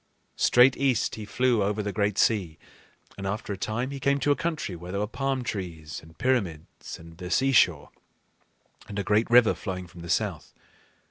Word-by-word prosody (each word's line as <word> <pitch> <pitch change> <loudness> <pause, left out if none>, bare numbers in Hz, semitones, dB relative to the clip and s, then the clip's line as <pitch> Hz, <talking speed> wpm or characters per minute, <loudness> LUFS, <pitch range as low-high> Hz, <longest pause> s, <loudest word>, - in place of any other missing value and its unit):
Straight 125 +2 +6
east 135 -5 +1
he 110 - -6
flew 120 +2 +1
over 105 +2 0
the 100 -1 -3
great 105 -2 0
sea, 95 -9 +1 0.6
and 95 - -3
after 105 +1 -3
a - - -4
time 115 +7 -3
he 140 - -5
came 140 +1 +2
to 145 - +2
a - - +4
country 160 - -3
where 85 +1 -9
there 100 - -2
were 105 - 0
palm 135 +3 -2
trees 85 -8 -5
and 80 +1 -17
pyramids 100 -12 -2
and 85 +1 -14
a 100 - -2
great 105 +3 +2
river 120 -1 +6
flowing 90 -3 -5
from 85 0 -13
the 85 - -9
south. - - -2
105 Hz, 175 wpm, -27 LUFS, 90-125 Hz, 0.6 s, Straight